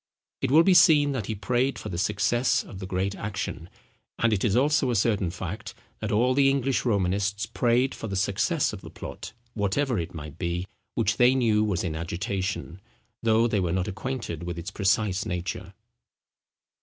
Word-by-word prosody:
It 135 Hz, -, 0 dB
will 155 Hz, +5 st, +6 dB
be 190 Hz, -, +5 dB
seen 155 Hz, -5 st, +6 dB
that 125 Hz, -8 st, -3 dB
he 110 Hz, -, -2 dB
prayed 125 Hz, +7 st, 0 dB
for 105 Hz, -, -6 dB
the 85 Hz, -3 st, -3 dB
success 105 Hz, +6 st, +1 dB
of 95 Hz, -, -10 dB
the 95 Hz, -, -6 dB
great 95 Hz, +1 st, -1 dB
action; 95 Hz, -5 st, -5 dB, 0.5 s
and 115 Hz, -1 st, +2 dB
it 100 Hz, -, 0 dB
is 105 Hz, -3 st, +2 dB
also 140 Hz, +1 st, +3 dB
a 120 Hz, -, +1 dB
certain 100 Hz, -3 st, +1 dB
fact, 95 Hz, +4 st, -6 dB, 0.2 s
that -, -, -3 dB
all 120 Hz, +5 st, +3 dB
the 135 Hz, +1 st, +4 dB
English 135 Hz, -1 st, 0 dB
Romanists 100 Hz, -1 st, 0 dB
prayed 120 Hz, +4 st, +1 dB
for 115 Hz, -, -6 dB
the 100 Hz, -, -4 dB
success 105 Hz, -, +1 dB
of 100 Hz, -, -7 dB
the -, -, -10 dB
plot, -, -, -8 dB, 0.2 s
whatever 115 Hz, +3 st, 0 dB
it 85 Hz, +1 st, -5 dB
might 75 Hz, 0 st, -8 dB
be, 85 Hz, 0 st, -2 dB, 0.3 s
which 105 Hz, +1 st, +1 dB
they 125 Hz, +1 st, +5 dB
knew 110 Hz, -4 st, +3 dB
was 100 Hz, -5 st, 0 dB
in 85 Hz, -4 st, -2 dB
agitation, 90 Hz, +2 st, -3 dB, 0.4 s
though 115 Hz, 0 st, +3 dB
they 110 Hz, -3 st, 0 dB
were 90 Hz, -3 st, 0 dB
not 90 Hz, +1 st, 0 dB
acquainted 105 Hz, -, -4 dB
with 85 Hz, -1 st, -5 dB
its 85 Hz, +4 st, -5 dB
precise 100 Hz, 0 st, +1 dB
nature. 95 Hz, +1 st, -4 dB
105 Hz, 185 wpm, -26 LUFS, 95-120 Hz, 0.5 s, will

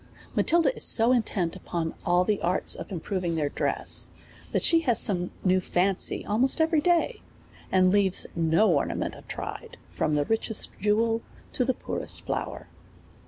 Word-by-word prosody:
Matilda 325 Hz, -6 st, +3 dB
is -, -, -4 dB
so 230 Hz, +2 st, +5 dB
intent 205 Hz, -8 st, 0 dB
upon 165 Hz, -2 st, -4 dB
all 175 Hz, +1 st, +3 dB
the 205 Hz, +1 st, -1 dB
arts 175 Hz, -, +1 dB
of -, -, -6 dB
improving 180 Hz, -1 st, -3 dB
their 150 Hz, -3 st, -1 dB
dress, -, -, -1 dB, 0.4 s
that -, -, 0 dB
she 330 Hz, -, +6 dB
has 255 Hz, -8 st, +1 dB
some 180 Hz, -5 st, +1 dB
new 185 Hz, 0 st, +3 dB
fancy 185 Hz, +1 st, +1 dB
almost 240 Hz, +9 st, +2 dB
every 320 Hz, -1 st, +2 dB
day, 350 Hz, +9 st, +1 dB, 0.5 s
and 185 Hz, -1 st, +4 dB
leaves 195 Hz, -2 st, +2 dB
no 165 Hz, +5 st, +3 dB
ornament 140 Hz, -, -1 dB
untried, -, -, -8 dB
from 155 Hz, -, -1 dB
the 145 Hz, -1 st, +1 dB
richest 225 Hz, -1 st, -1 dB
jewel 225 Hz, +3 st, +1 dB, 0.3 s
to -, -, +1 dB
the 255 Hz, 0 st, 0 dB
poorest -, -, -2 dB
flower. -, -, -4 dB
200 Hz, 155 wpm, -26 LUFS, 175-240 Hz, 0.5 s, she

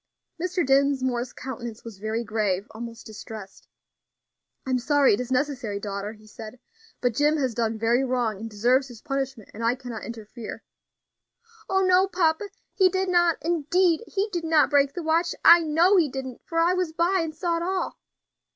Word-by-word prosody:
Mr. 360 Hz, -1 st, 0 dB
Dinsmore's 260 Hz, -2 st, +1 dB
countenance 235 Hz, -3 st, -7 dB
was 225 Hz, -4 st, -10 dB
very 220 Hz, +3 st, -2 dB
grave, 210 Hz, -3 st, -1 dB
almost 230 Hz, +1 st, -8 dB
distressed. 215 Hz, -2 st, -10 dB, 1.0 s
"I 265 Hz, -, -3 dB
am 255 Hz, -, +2 dB
sorry 280 Hz, +1 st, +3 dB
it 205 Hz, -, 0 dB
is 250 Hz, 0 st, -5 dB
necessary, 260 Hz, -6 st, -1 dB
daughter," 200 Hz, 0 st, -4 dB
he 215 Hz, -1 st, -18 dB
said, 220 Hz, +3 st, -10 dB, 0.4 s
"but 245 Hz, -2 st, +1 dB
Jim 295 Hz, +5 st, +2 dB
has 260 Hz, -5 st, 0 dB
done 225 Hz, -1 st, -1 dB
very 235 Hz, +4 st, +2 dB
wrong, 245 Hz, -5 st, -1 dB
and 225 Hz, +1 st, -6 dB
deserves 245 Hz, +6 st, +2 dB
his 240 Hz, -4 st, -12 dB
punishment, 270 Hz, -5 st, -4 dB
and 225 Hz, -, -7 dB
I 235 Hz, +2 st, +2 dB
cannot 245 Hz, -3 st, -7 dB
interfere." 225 Hz, 0 st, -8 dB, 1.1 s
"Oh! 385 Hz, 0 st, +2 dB
no, 370 Hz, +1 st, +4 dB
papa, 355 Hz, +1 st, 0 dB, 0.2 s
he 375 Hz, -2 st, +4 dB
did 375 Hz, +1 st, -1 dB
not, 345 Hz, -2 st, +3 dB
indeed 340 Hz, +2 st, +2 dB
he 400 Hz, +1 st, -1 dB
did 345 Hz, -3 st, -3 dB
not 320 Hz, -2 st, +3 dB
break 280 Hz, +1 st, +3 dB
the 350 Hz, -, -4 dB
watch. 330 Hz, +2 st, +1 dB
I 340 Hz, +1 st, +10 dB
know 330 Hz, +5 st, +4 dB
he 325 Hz, -5 st, +3 dB
didn't, 260 Hz, -1 st, -6 dB
for 330 Hz, -, -4 dB
I 340 Hz, +2 st, +4 dB
was 365 Hz, -3 st, -1 dB
by 350 Hz, +3 st, +2 dB
and 320 Hz, -2 st, -4 dB
saw 335 Hz, +1 st, -1 dB
it -, -, -3 dB
all." 375 Hz, +2 st, -2 dB
270 Hz, 180 wpm, -25 LUFS, 230-335 Hz, 1.1 s, I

